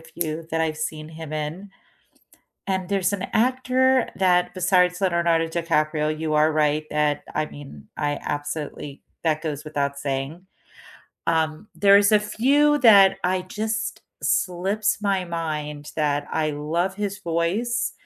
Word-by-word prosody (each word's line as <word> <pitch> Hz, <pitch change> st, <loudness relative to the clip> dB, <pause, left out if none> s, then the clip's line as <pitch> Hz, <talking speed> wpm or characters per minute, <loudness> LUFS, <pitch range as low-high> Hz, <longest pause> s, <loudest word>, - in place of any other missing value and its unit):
few 160 Hz, 0 st, -5 dB
that 160 Hz, 0 st, 0 dB
I've 155 Hz, -1 st, 0 dB
seen 155 Hz, 0 st, -4 dB
him 160 Hz, -1 st, -8 dB
in, 155 Hz, +6 st, -4 dB, 1.0 s
and 190 Hz, -1 st, -2 dB
there's 195 Hz, -1 st, +1 dB
an 190 Hz, -1 st, -3 dB
actor 255 Hz, +2 st, +2 dB
that 180 Hz, -2 st, +2 dB
besides 180 Hz, 0 st, +2 dB
Leonardo 170 Hz, -3 st, +2 dB
DiCaprio,- 155 Hz, -2 st, 0 dB
you 160 Hz, -1 st, -1 dB
are 155 Hz, +1 st, +4 dB
right 155 Hz, 0 st, +1 dB
that 150 Hz, -1 st, 0 dB
I 155 Hz, -, +1 dB
mean, 135 Hz, -, -12 dB
I 145 Hz, 0 st, -1 dB
absolutely 145 Hz, -1 st, -5 dB, 0.2 s
that 155 Hz, -2 st, +1 dB
goes 150 Hz, -2 st, -4 dB
without 140 Hz, -2 st, -2 dB
saying. 140 Hz, +6 st, -4 dB, 0.8 s
Um, 160 Hz, +4 st, 0 dB
there's 200 Hz, +1 st, +5 dB
a 210 Hz, -, +6 dB
few 280 Hz, +8 st, +3 dB
that 200 Hz, -6 st, +7 dB
I 185 Hz, +1 st, +1 dB
just 220 Hz, +4 st, -3 dB, 0.2 s
slips 195 Hz, +4 st, 0 dB
my 195 Hz, -3 st, 0 dB
mind 150 Hz, -3 st, -4 dB
that 145 Hz, -2 st, 0 dB
I 155 Hz, -1 st, 0 dB
love 165 Hz, +6 st, -2 dB
his 205 Hz, -1 st, -3 dB
voice, 185 Hz, +7 st, -1 dB
165 Hz, 135 wpm, -23 LUFS, 155-195 Hz, 1.0 s, that